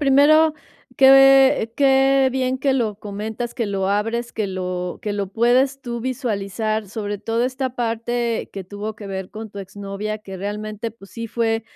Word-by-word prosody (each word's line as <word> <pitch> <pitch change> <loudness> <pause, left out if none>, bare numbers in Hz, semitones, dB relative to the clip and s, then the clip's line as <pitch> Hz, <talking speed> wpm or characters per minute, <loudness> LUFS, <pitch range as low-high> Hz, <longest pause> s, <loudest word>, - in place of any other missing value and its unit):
primero 300 +3 +5 0.4
que 270 -2 +6
qué 270 -1 +4
bien 260 0 0
que 270 +1 +1
lo 225 -6 0
comentas, 215 +3 -5
que 235 -4 -1
lo 195 -1 -1
abres, 225 +4 -1
que 215 -3 -2
lo 180 -1 -4
que 210 - -3
lo 200 -2 -2
puedes 250 +5 +2
tú 235 -2 -5
visualizar, 220 -4 -2
sobre 205 0 -4
todo 225 +3 -1
esta 255 0 -3
parte 235 0 -2
que 195 -1 -6
tuvo 205 +3 -6
que 205 - -9
ver 190 -1 -5
con 220 0 -7
tu 200 -1 -8
exnovia, 200 +2 -5
que 195 -2 -9
realmente, 210 +3 -4
pues 195 -4 -17
sí 230 0 -6
fue 225 -1 0
225 Hz, 170 wpm, -21 LUFS, 205-255 Hz, 0.4 s, que